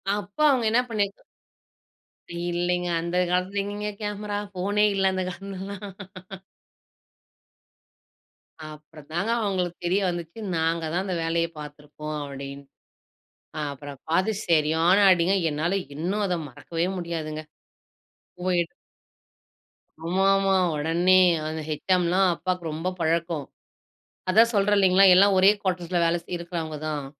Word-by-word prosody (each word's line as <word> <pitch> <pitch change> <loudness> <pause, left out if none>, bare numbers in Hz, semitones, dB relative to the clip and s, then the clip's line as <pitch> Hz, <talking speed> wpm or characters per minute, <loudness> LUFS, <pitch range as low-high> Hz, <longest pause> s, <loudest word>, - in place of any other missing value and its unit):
அப்போ 205 +7 -6
அவங்க 255 -5 +2
என்ன 240 +2 +4
பண்ணீக் 205 -3 -1 1.2
இல்லீங்க. 175 +1 -1
அந்த 170 +1 -2
காலத்துல 185 +3 0
எங்கீங்க 205 +1 -4
கேமரா, 205 0 -3 0.2
போனே 205 +3 +2
இல்ல. 195 -1 +2
அந்தக் 185 -1 -2
காலத்துலல்லா. 195 +1 -7 2.9
அப்பறம் 155 0 -13
தாங்க 195 +7 0
அவங்களுக்கு 185 -4 -1
தெரிய 185 +3 +2
வந்துச்சு, 170 +3 -6 0.2
நாங்க 165 +1 0
தான் 180 +2 0
அந்த 185 -2 -2
வேலையைப் 165 0 -1
பாத்துருக்கோம் 150 +1 -8
அப்டின்னு. 140 0 -7 1.1
அப்புறம் 140 0 -9
பாத்து 185 +6 +2 0.2
சரியான 160 +2 +3
அடிங்க. 180 +1 +3 0.2
என்னால 160 +6 -1 0.2
இன்னும் 185 +8 -1
அத 180 - 0
மறக்கவே 165 +6 -3
முடியாதுங்க. 160 -3 -4 1.0
போயிட். 180 -2 0 1.3
ஆமாமா. 195 +2 +3 0.2
உடனே 170 +5 +3 0.3
அந்த 160 0 -4
ஹெச்செம்லாம் 180 +4 +2
அப்பாக்கு 180 0 -3
ரொம்ப 160 +4 -4
பழக்கம். 165 -2 0 0.8
அதா 220 +5 +7
சொல்றே 205 0 +3
இல்லைங்களா. 190 0 +5
எல்லா 195 +2 +7
ஒரே 190 +1 +7
கோட்டர்ஸ்ல 180 -1 -1
வேல 165 +1 +2
செய் 175 - -5
இருக்கறவங்க 165 -3 -5
தான். 150 -2 -3
175 Hz, 115 wpm, -25 LUFS, 160-195 Hz, 2.9 s, அதா